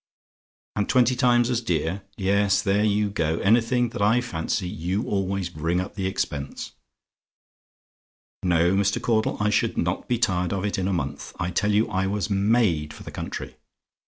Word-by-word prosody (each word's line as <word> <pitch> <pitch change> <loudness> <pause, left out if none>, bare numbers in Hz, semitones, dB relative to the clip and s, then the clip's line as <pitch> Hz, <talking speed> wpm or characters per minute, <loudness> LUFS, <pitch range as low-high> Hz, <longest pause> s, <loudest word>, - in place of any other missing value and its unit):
"AND 105 -1 -1
TWENTY 125 0 +4
TIMES 120 0 +3
AS 120 -1 0
DEAR? 90 -2 -1 0.2
"Yes; 100 0 +2
there 100 +1 +2
you 105 -1 +1
go! 80 -5 0
Anything 120 +3 +3
that 105 - -6
I 110 +4 +4
fancy, 90 -5 -2
you 90 +5 -2
always 95 -2 -1
bring 85 +1 -1
up 95 +2 -4
the 95 -3 -2
expense. 70 -6 -4 1.7
"No, 85 0 +3
Mr. 100 +3 +1
Caudle, 115 -2 0
I 105 0 +1
should - - +1
not - - -1
be 120 - +1
tired 90 -5 0
of 100 0 -2
it 100 - -1
in 95 - -1
a - - 0
month. 70 -5 -4
I 85 +1 -1
tell 105 +4 +1
you 105 +2 +3
I 95 +1 -1
was 105 +1 -2
made 100 -7 +2
for - - -11
the - - -8
country. - - -6
100 Hz, 175 wpm, -24 LUFS, 90-110 Hz, 1.7 s, TWENTY